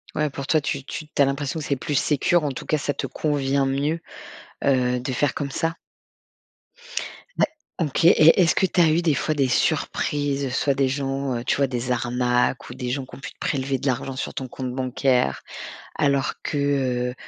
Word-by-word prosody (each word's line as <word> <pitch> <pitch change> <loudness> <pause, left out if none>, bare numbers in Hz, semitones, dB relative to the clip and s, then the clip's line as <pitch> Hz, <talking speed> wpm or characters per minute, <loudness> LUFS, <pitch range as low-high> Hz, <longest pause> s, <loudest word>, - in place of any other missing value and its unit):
Ouais, 150 0 +1
pour 140 0 -6
toi, 155 - +3
tu 140 -1 -3
tu 155 +3 -6
tu 150 - 0
as - - +7
l'impression 140 +3 -2
que 150 - -5
c'est 140 - 0
plus 145 +3 -3
sécure, 155 +4 +2
en 145 - 0
tout 130 - -7
cas 155 - +1
ça 145 0 -1
te - - -3
convient 140 -2 0
mieux, 145 +5 0 0.6
heu, 125 -2 +2
de 130 +2 -3
faire 135 +1 +1
comme 140 -1 -3
ça? 165 +4 -1 1.6
Ouais, - - +6 0.3
OK. 160 0 0
Et 165 0 +7
est-ce 165 - +4
que - - +3
tu 185 -1 +2
as 165 - +5
eu 160 +2 +3
des 165 -3 +2
fois 150 +3 0
des 140 -3 +2
surprises, 140 +1 0
soit 140 +2 +2
des 135 0 +2
gens, 135 -1 -1
heu, 120 - -4
tu - - +1
vois? 140 -1 +3
Des 125 -1 -3
arnaques 125 +1 +1
ou - - -6
des 125 - -4
gens 135 +1 -2
qui - - -12
ont - - -12
pu - - -7
prélever 135 -1 -1
de 135 +2 -4
l'argent 130 +1 -1
sur 130 - -4
ton 130 0 -4
compte 130 0 -5
bancaire, 130 - +1 0.5
alors 140 -1 +1
que, 145 - -2 0.5
heu, - - -5
140 Hz, 210 wpm, -24 LUFS, 130-145 Hz, 1.6 s, as